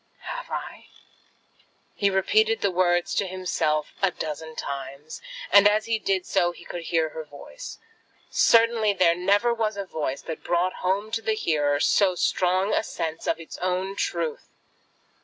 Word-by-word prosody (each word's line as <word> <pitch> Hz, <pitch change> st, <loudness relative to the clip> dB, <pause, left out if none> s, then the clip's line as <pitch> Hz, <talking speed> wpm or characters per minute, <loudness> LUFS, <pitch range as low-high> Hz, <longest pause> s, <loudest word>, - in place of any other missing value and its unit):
"Have -, -, -6 dB
I?" -, -, -6 dB, 1.1 s
he 200 Hz, -, +1 dB
repeated 435 Hz, -, +2 dB
the 200 Hz, -, +2 dB
words 175 Hz, -1 st, +2 dB
to 200 Hz, -, 0 dB
himself 165 Hz, -5 st, -1 dB
a 195 Hz, -, +4 dB
dozen 160 Hz, -1 st, -6 dB
times, 140 Hz, +2 st, -6 dB, 0.3 s
and 200 Hz, 0 st, +8 dB
as 210 Hz, +1 st, +2 dB
he 225 Hz, -1 st, 0 dB
did 190 Hz, -3 st, 0 dB
so, 175 Hz, -2 st, +1 dB
he 170 Hz, -, -14 dB
could 175 Hz, -, -6 dB
hear 165 Hz, -2 st, +1 dB
her 160 Hz, +1 st, -7 dB
voice. 155 Hz, -, -10 dB, 0.5 s
Certainly 230 Hz, -2 st, +4 dB
there 175 Hz, -3 st, +4 dB
never 200 Hz, +7 st, +2 dB
was 220 Hz, -3 st, -1 dB
a 200 Hz, -, -3 dB
voice 150 Hz, -6 st, -4 dB
that 160 Hz, -, -6 dB
brought 175 Hz, +1 st, +1 dB
home 200 Hz, +4 st, 0 dB
to 225 Hz, 0 st, -1 dB
the 220 Hz, -1 st, 0 dB
hearer 145 Hz, -7 st, +1 dB
so 190 Hz, +3 st, +3 dB
strong 185 Hz, +3 st, +1 dB
a -, -, +3 dB
sense 160 Hz, -6 st, -5 dB
of -, -, 0 dB
its 165 Hz, -, -9 dB
own 185 Hz, +2 st, -1 dB
truth! 170 Hz, -5 st, -2 dB
185 Hz, 160 wpm, -25 LUFS, 160-205 Hz, 1.1 s, and